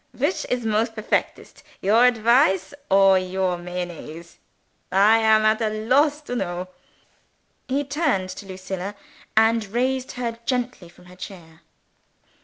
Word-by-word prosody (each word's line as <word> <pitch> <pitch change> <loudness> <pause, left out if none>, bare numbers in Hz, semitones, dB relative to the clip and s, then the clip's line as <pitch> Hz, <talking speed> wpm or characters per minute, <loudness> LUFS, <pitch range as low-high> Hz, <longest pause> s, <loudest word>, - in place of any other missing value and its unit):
"Which 290 +8 -1
is 250 -2 -1
most 225 +1 0
perfectest, 215 -1 -3 0.2
your 225 +6 +4
advice 225 -4 +3 0.2
or 195 -1 +5
your 185 0 -1
Mayonnaise, 175 -2 -7 0.5
I 205 +4 +5
am 220 -1 +4
at 215 +1 +3
a 220 - +1
loss 265 +8 +1
to 245 -5 -6
know." 180 -4 -3 1.0
He 275 +2 0
turned 280 - -1
to 200 - -10
Lucilla, 190 +1 -6 0.4
and 225 0 +4
raised 255 +5 -1
her 235 -2 -4
gently 250 -8 -2
from 175 +1 -20
her 180 0 -15
chair. 170 -4 -11
215 Hz, 130 wpm, -23 LUFS, 185-245 Hz, 1.0 s, or